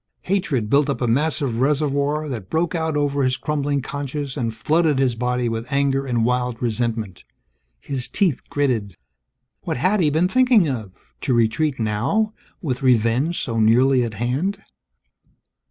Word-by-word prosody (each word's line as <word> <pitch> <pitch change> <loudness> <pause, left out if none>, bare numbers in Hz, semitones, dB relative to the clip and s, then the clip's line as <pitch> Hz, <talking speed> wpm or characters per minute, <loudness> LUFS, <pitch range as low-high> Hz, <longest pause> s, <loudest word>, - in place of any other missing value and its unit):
Hatred 175 - 0
built 140 +5 +3
up 140 - -1
a 125 - 0
massive 135 -1 +1
reservoir, 145 +1 +1
that 110 -9 -6
broke 165 +2 0
out 160 -3 -1
over 145 -1 0
his 130 -1 +1
crumbling 145 -2 -1
conscience 145 0 -4
and 120 -5 -1
flooded 155 +4 +2
his 130 -2 +2
body 125 +1 -1
with 115 +1 -4
anger 140 -1 +1
and 120 -3 +1
wild 125 -1 0
resentment. 115 -4 -2 0.6
His 130 - -4
teeth 180 -10 +1
gritted. 115 - -1 0.6
What - - -3
had 185 +11 +2
he 160 -4 +3
been 160 +5 +2
thinking 250 -4 +4
of 110 -8 -4 0.3
to 130 - +1
retreat 120 +5 +1
now, 125 - 0 0.3
with 130 -6 -2
revenge 125 +6 +2
so 115 -3 -2
nearly 125 +4 +4
at 115 -2 -4
hand! 155 - -2
135 Hz, 155 wpm, -21 LUFS, 120-150 Hz, 0.6 s, thinking